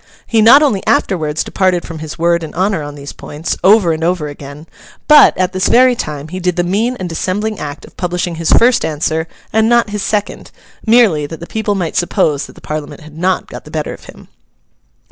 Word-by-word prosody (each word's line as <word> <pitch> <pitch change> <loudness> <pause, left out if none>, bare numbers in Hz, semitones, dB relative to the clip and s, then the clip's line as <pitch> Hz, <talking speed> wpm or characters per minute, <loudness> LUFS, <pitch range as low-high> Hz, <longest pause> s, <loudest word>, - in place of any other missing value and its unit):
He 225 -1 +2
not 250 +7 +7
only 215 -10 +1
afterwards 155 -4 0
departed 185 -2 0
from 165 -1 -8
his 155 0 -7
word 170 +1 +1
and 160 - -8
honour 190 -1 0
on 145 0 -7
these 140 0 -9
points, 150 +3 -5
over 190 -3 +5
and 160 +1 -4
over 170 -3 0
again, 145 +1 -10 0.4
but, 300 -1 +7
at 185 0 0
this 185 0 0
very 255 +1 +5
time, 150 -7 -5
he 185 +3 -5
did 180 -1 -1
the 175 - 0
mean 215 +8 0
and 185 - -4
dissembling 195 +6 -3
act 145 -1 -7
of - - -18
publishing 180 -1 -2
his 165 -1 -1
first 245 +1 +4
answer 160 +1 -1 0.3
and 220 +1 +3
not 235 -3 +2
his 210 -1 -3
second—merely 210 -3 0
that 165 +1 -9
the 170 - -8
people 220 +1 -2
might 175 -4 -3
suppose 165 -5 0
that - - -14
the - - -17
Parliament 150 -1 -6
had 155 0 -14
not 180 +3 0
got - - -10
the - - -13
better - - -4
of - - -13
him. - - -14
175 Hz, 210 wpm, -15 LUFS, 155-210 Hz, 0.4 s, not